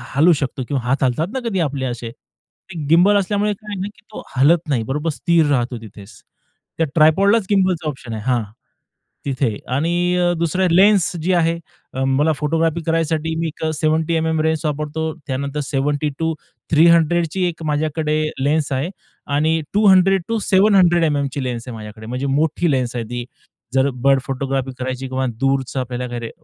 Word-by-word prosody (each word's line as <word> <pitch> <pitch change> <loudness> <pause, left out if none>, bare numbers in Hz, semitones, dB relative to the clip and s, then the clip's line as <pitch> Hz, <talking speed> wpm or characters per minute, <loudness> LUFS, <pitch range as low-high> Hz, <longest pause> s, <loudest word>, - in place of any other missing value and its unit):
हलू 165 +5 +5
शकतो 130 -1 -3
किंवा 140 -4 -1
हात 135 +3 0
हलतात 130 +6 +1
ना 265 - -1
कधी 190 -3 -1
आपले 140 -4 -1
असे, 120 -2 -4
ते 170 +7 -15
गिम्बल 180 +6 +5
असल्यामुळे 205 +2 0
काय 210 +1 -11
आहे 190 - -5
ना 200 - -2
की - - -23
तो - - -7
हालत 160 +5 +3
नाही, 120 -5 +1
बरोबर 150 +7 -2
स्थिर 165 +1 +2
राहतो 125 -2 0
तिथेच. 105 -1 -13 0.6
त्या 165 - +2
ट्राइपॉडलाच 190 +7 +4
गिम्बलचा 185 -5 +1
ऑप्शन 130 -5 -7
आहे 110 - -5
हां. 125 -3 +1 0.8
तिथे 130 -6 -1 0.2
आणि 155 +6 0 0.3
अ, 175 0 +2
दुसऱ्या 175 +3 +1
लेन्स 195 +1 +5
जी 185 +3 +1
आहे, 165 -1 +2 0.4
अ, 130 - -2
मला 135 +4 +2
फोटोग्राफी 165 +2 0
करायसाठी 160 -1 0
मी 165 - -1
एक 160 +1 -5
70 155 +2 +1
एम-एम 160 -1 0
लेन्स 160 0 0
वापरतो, 150 +1 -2
त्यानंतर 140 +2 -3
70 145 +2 -1
टू 160 0 0 0.4
300 170 +1 +4
ची 190 -1 -1
एक 165 -1 -6
माझ्याकडे 155 0 0 0.2
लेन्स 145 +1 0
आहे 135 +6 -1 0.5
आणि 160 +2 +2
200 195 -2 +5
टू 230 -1 -1
700 190 -3 +4
एम-एमची 140 -3 -1
लेन्स 120 -1 -4
आहे 120 - -6
माझ्याकडे, 110 0 -10
म्हणजे 125 +4 -4
मोठी 155 +4 +1
लेन्स 125 -2 -1
आहे 115 -2 -3
ती, 120 +1 -5 0.5
जर 135 +1 +3 0.2
बर्ड 135 -1 +5
फोटोग्राफी 135 0 -2
करायची 130 +1 -4
किंवा 130 +1 -2
दूरचं 135 0 0
आपल्याला 125 0 -4
खरे 115 -1 -5
155 Hz, 170 wpm, -20 LUFS, 130-170 Hz, 0.8 s, हलू